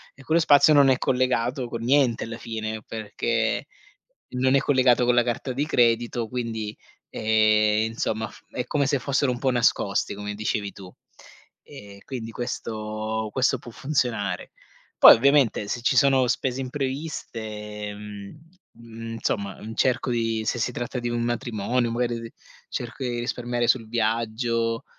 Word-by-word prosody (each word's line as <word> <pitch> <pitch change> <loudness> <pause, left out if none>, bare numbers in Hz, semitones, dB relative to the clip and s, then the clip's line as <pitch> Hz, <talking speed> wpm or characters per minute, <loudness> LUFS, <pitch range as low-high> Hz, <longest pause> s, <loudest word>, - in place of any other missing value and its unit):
e 140 - -15
quello 160 +4 +2
spazio 150 0 +6
non 140 -2 +6
è 130 - +4
collegato 125 0 0
con 115 -1 -5
niente 130 -2 +3
alla 115 0 -6
fine, 110 -2 -5
perché 110 +1 -1 0.7
non 130 +2 +3
è - - +5
collegato 130 -3 +3
con 125 0 +3
la 120 - +5
carta 125 +2 -3
di 140 +4 -1
credito. 120 -3 +1
Quindi, 115 -4 -4 0.3
ehm, 110 0 +3
insomma, 110 -1 -2 0.2
è 125 - -3
come 140 -2 +1
se 140 -2 +1
fossero 140 -1 +1
un 120 - -4
po' 130 -1 +1
nascosti, 115 -5 +1
come 105 0 -5
dicevi 105 -1 -2
tu. 95 -2 -12 0.7
E 100 -1 -12
quindi, 115 -4 -6
questo 110 -2 -4
questo 130 -1 +2
può 120 - -11
funzionare. 115 -9 -2 0.5
Poi - - +11
ovviamente 130 -5 +3
se 120 - -3
ci 125 - +1
sono 135 -1 +4
spese 130 +1 -1
impreviste, 115 -7 -5
mhmm, 115 - -11
insomma, 100 -3 -3
mhmm, 110 +1 -7
cerco 130 0 +1
di 115 -2 0
se 120 - -1
si 125 - 0
tratta 120 +1 -4
di 120 0 -3
un 120 0 -1
matrimonio, 120 0 -1
magari 120 0 -1
di 115 0 -9 0.4
cerco 125 +3 -5
di 120 -1 -2
risparmiare 120 0 -2
sul 115 -4 +2
viaggio, 115 0 -1
120 Hz, 150 wpm, -25 LUFS, 110-125 Hz, 0.7 s, Poi